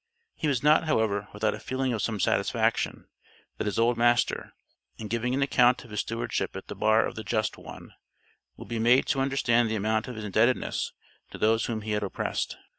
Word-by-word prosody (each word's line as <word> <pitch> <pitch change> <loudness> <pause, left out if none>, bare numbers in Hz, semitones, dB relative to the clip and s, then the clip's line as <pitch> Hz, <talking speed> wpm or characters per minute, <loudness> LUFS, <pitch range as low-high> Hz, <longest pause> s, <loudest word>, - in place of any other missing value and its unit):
He 155 - -3
was 135 -4 0
not, 150 +2 +5
however, 110 -8 0
without 105 +1 -1
a - - -7
feeling 130 -1 -2
of 110 - -2
some 110 -1 -2
satisfaction, - - 0 0.5
that - - -2
his 105 - -2
old 115 +1 +2
master, 120 +1 +2 0.5
in 110 - -7
giving 120 +3 -1
an 140 - +2
account 125 -2 +3
of 115 - -15
his 105 - -3
stewardship 115 +1 -2
at - - -7
the - - -8
Bar 110 +1 +3
of - - -4
the 110 - -7
Just 110 +1 -1
One, - - -12 0.6
would - - -10
be 115 -1 -3
made 120 +3 +4
to 135 - +1
understand 120 -4 +2
the 110 - -1
amount 110 +2 0
of 125 - -6
his 110 -1 -6
indebtedness 110 +5 +1 0.4
to - - -9
those 110 +1 +2
whom 110 -2 -3
he 110 0 -5
had 105 0 0
oppressed. 100 - -3
115 Hz, 205 wpm, -27 LUFS, 110-125 Hz, 0.6 s, not